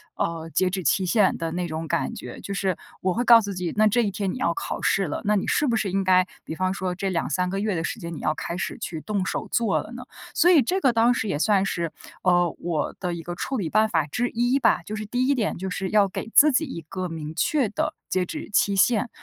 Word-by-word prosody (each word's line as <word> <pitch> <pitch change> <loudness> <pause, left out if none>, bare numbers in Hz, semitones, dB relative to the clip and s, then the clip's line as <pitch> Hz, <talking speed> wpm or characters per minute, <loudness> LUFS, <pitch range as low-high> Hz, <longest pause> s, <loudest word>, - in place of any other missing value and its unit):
呃， 165 -1 -3
截 185 -1 +2
止 185 -1 -3
期 185 +6 +2
限 195 +1 +3
的 165 0 -3
那 180 0 -2
种 160 0 -5
感 130 - -1
觉。 125 - -8
就 200 - -5
是 190 -3 -1 0.2
我 185 -1 +1
会 240 - 0
告 235 -1 +8
诉 205 -1 -4
自 - - -6
己， 180 -2 -3
那 215 0 +5
这 240 +3 +3
一 200 - -1
天 195 -1 -2
你 - - -5
要 - - +1
考 390 - -4
试 195 -1 +2
了， - - -4
那 210 +1 +3
你 - - -2
是 300 - +2
不 235 - +1
是 200 - -1
应 195 0 0
该 185 0 +4 0.2
比 160 - -6
方 185 +1 0
说 185 -2 -3
这 190 +1 -2
2，3 180 +1 -1
个 195 +1 -2
月 210 -2 0
的 165 - -2
时 - - -4
间 170 0 -5
你 - - -7
要 155 - 0
开 170 - -4
始 - - -3
去 160 -2 -5
动 200 -3 -2
手 - - -3
做 230 -4 +2
了 220 - -11
呢？ 250 +1 -7 0.3
所 355 - +5
以 310 -6 +7
这 375 +11 -1
个 260 - +4
当 230 +2 +4
时 225 - -2
也 145 - -1
算 200 +1 +3
是， 170 -4 -2 0.3
呃， 175 -2 +3
我 170 -3 -2
的 180 -2 -2
一 165 -1 -6
个 175 - -11
处 270 - -2
理 170 -6 -2
办 215 +1 +3
法 160 -5 +1
之 245 +11 -1
一 245 +3 +1
吧， - - +3
就 215 - -5
是 215 0 -5
第 250 +4 0
一 280 - +3
点 220 -4 -1
就 190 +1 -4
是 190 +1 -3
要 210 -2 +4
给 205 +4 -6
自 300 +1 +7
己 315 +5 +1
一 210 - -6
个 185 -2 -4
明 155 -1 -6
确 295 -10 +1
的 210 - -2 0.2
截 185 -1 +1
止 - - -7
期 200 0 +2
限。 225 +4 +3
195 Hz, 295 characters per minute, -24 LUFS, 175-225 Hz, 0.3 s, 告